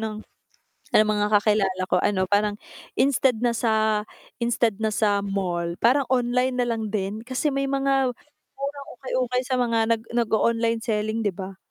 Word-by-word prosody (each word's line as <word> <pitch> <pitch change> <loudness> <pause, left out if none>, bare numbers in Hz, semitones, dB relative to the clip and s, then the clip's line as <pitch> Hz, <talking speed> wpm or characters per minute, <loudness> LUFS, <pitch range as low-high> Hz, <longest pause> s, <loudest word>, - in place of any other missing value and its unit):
ng 215 -1 -4 0.7
mga 210 -1 +3
kakilala 195 -3 +1
ko - - +2
ano, 190 -2 +1
parang 205 +1 +1 0.4
instead 260 -2 +3
na 240 -1 +2
sa 220 -2 +1 0.4
instead 235 -2 +1
na 220 - +1
sa 205 -1 +2
mall, 180 -4 -2
parang 260 +4 +3
online 250 0 +1
na 250 - +2
lang 225 -2 -2
din 205 0 -3
kasi 260 +4 -1
may 275 0 -1
mga 270 -1 +1 0.4
murang 280 0 -5
ukay-ukay 255 0 -1
sa 255 0 -1
mga 230 -2 +1
nag 225 -1 -1
nag-o-online 230 0 +1
selling, 220 0 -1
'di 205 -3 0
ba? 190 0 -7
225 Hz, 155 wpm, -24 LUFS, 210-250 Hz, 0.7 s, mga